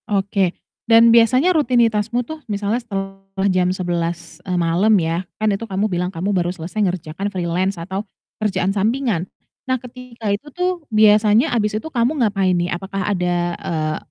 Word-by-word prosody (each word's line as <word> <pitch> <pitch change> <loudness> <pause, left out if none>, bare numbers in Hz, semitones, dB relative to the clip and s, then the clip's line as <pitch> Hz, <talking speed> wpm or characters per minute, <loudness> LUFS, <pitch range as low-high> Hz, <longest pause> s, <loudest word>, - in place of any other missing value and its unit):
Oke 195 -2 0 0.3
dan 230 0 +7
biasanya 255 +9 +5
rutinitasmu 240 - +2
tuh 315 +4 -8
misalnya 205 +4 -1
setelah 195 -2 -4
jam 185 -2 +2
11.00, 170 -2 -3
eee, 180 -2 -2
malam 170 +6 +2
ya, 165 +2 -1 0.2
kan 215 - +1
itu 200 +3 -3
kamu 205 -1 -1
bilang 180 -2 -2
kamu 190 +3 -2
baru 175 -1 +1
selesai 180 +4 -5
mengerjakan 180 +1 -2
freelance 185 +1 -1
atau 190 +4 -4 0.4
kerjaan 195 -2 0
sampingan. 220 -2 0 0.5
Nah 260 - +2
ketika 250 -2 -9
itu 205 +9 -5
tuh 360 +1 -2
biasanya 215 +1 +4
habis 210 -2 0
itu - - -14
kamu 260 0 0
ngapain 195 -3 +1
nih? 175 0 -1
Apakah 195 +2 -4
ada, 180 -1 0 0.2
eee, 155 -2 -2
200 Hz, 155 wpm, -20 LUFS, 180-230 Hz, 0.5 s, dan